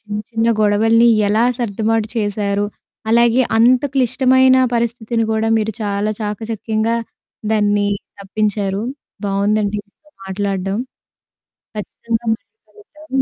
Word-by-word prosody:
చిన్న 210 Hz, -1 st, -5 dB
చిన్న 225 Hz, 0 st, 0 dB
గొడవల్ని 225 Hz, +3 st, +4 dB, 0.2 s
ఎలా 220 Hz, +3 st, +3 dB
సర్దుబాటు 220 Hz, -1 st, 0 dB
చేశారు. 205 Hz, -1 st, 0 dB, 0.5 s
అలాగే 235 Hz, +2 st, +4 dB, 0.2 s
అంత 245 Hz, +3 st, +5 dB
క్లిష్టమైన 260 Hz, 0 st, +4 dB, 0.2 s
పరిస్థితిని 230 Hz, -1 st, -1 dB
కూడా 220 Hz, 0 st, 0 dB
మీరు, 220 Hz, 0 st, -1 dB
చాలా 205 Hz, +1 st, -1 dB
చాకచక్యంగా 220 Hz, +1 st, -2 dB, 0.6 s
దాన్ని 205 Hz, -1 st, +2 dB, 0.3 s
తప్పించారు. 205 Hz, 0 st, -1 dB, 0.4 s
బావుందండి 205 Hz, +1 st, 0 dB
మీతో 300 Hz, +9 st, -29 dB, 0.2 s
మాట్లాడడం. 195 Hz, +1 st, -2 dB, 1.0 s
ఖచ్చితంగా 225 Hz, +2 st, -4 dB
మళ్ళి 225 Hz, -, -10 dB, 0.2 s
కలుద్దాము. 310 Hz, -10 st, -5 dB
220 Hz, 100 wpm, -18 LUFS, 205-235 Hz, 1.0 s, అంత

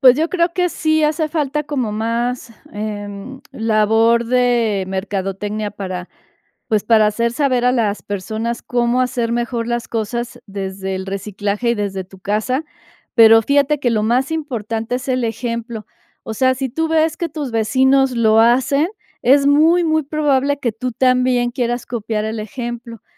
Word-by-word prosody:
Pues, 255 Hz, -1 st, +7 dB
yo 320 Hz, +2 st, +1 dB
creo 340 Hz, -1 st, +1 dB
que 360 Hz, 0 st, +1 dB
sí 315 Hz, -2 st, 0 dB
hace 310 Hz, +1 st, +1 dB
falta 300 Hz, -2 st, -1 dB
como 270 Hz, -6 st, -2 dB
más, 230 Hz, +2 st, -2 dB, 0.2 s
em, 210 Hz, +4 st, -6 dB
labor 225 Hz, 0 st, +2 dB
de 240 Hz, -5 st, +2 dB
mercadotecnia 195 Hz, +2 st, -3 dB
para, 185 Hz, -3 st, -6 dB, 0.6 s
pues, 215 Hz, -4 st, +1 dB
para 220 Hz, -2 st, +4 dB
hacer 230 Hz, +3 st, 0 dB
saber 255 Hz, -2 st, +1 dB
a 250 Hz, -, +4 dB
las 215 Hz, -4 st, 0 dB
personas 220 Hz, +4 st, -4 dB
cómo 240 Hz, 0 st, 0 dB
hacer 245 Hz, -2 st, -1 dB
mejor 235 Hz, -1 st, -2 dB
las 240 Hz, 0 st, -2 dB
cosas 235 Hz, +2 st, -3 dB
desde 190 Hz, -1 st, -5 dB
el 190 Hz, 0 st, -5 dB
reciclaje 205 Hz, +3 st, -2 dB
y 235 Hz, -, +2 dB
desde 195 Hz, -3 st, -3 dB
tu 190 Hz, +1 st, -16 dB
casa. 215 Hz, +9 st, -1 dB, 0.5 s
Pero, 225 Hz, -1 st, +8 dB
fíjate 285 Hz, +3 st, +2 dB
que 245 Hz, -, +1 dB
lo 215 Hz, -2 st, +1 dB
más 245 Hz, +6 st, +1 dB
importante 235 Hz, -6 st, -3 dB
es 255 Hz, +2 st, -7 dB
el 255 Hz, -2 st, 0 dB
ejemplo. 230 Hz, -1 st, -4 dB, 0.4 s
O 220 Hz, -, -6 dB
sea, 260 Hz, +3 st, +2 dB
si 265 Hz, +1 st, -3 dB
tú 320 Hz, +6 st, -1 dB
ves 320 Hz, 0 st, +2 dB
que 340 Hz, -, -2 dB
tus 290 Hz, -3 st, -4 dB
vecinos 260 Hz, +4 st, +3 dB
lo 225 Hz, -2 st, +4 dB
hacen, 260 Hz, +6 st, +3 dB, 0.3 s
es 275 Hz, +3 st, +5 dB
muy, 320 Hz, +5 st, +4 dB
muy 315 Hz, -1 st, +2 dB
probable 285 Hz, -1 st, +1 dB
que 235 Hz, -5 st, -1 dB
tú 250 Hz, +3 st, -4 dB
también 250 Hz, 0 st, +2 dB
quieras 240 Hz, 0 st, -2 dB
copiar 220 Hz, -2 st, -3 dB
el 220 Hz, 0 st, -3 dB
ejemplo. 235 Hz, +1 st, -6 dB
235 Hz, 165 wpm, -18 LUFS, 215-265 Hz, 0.6 s, Pero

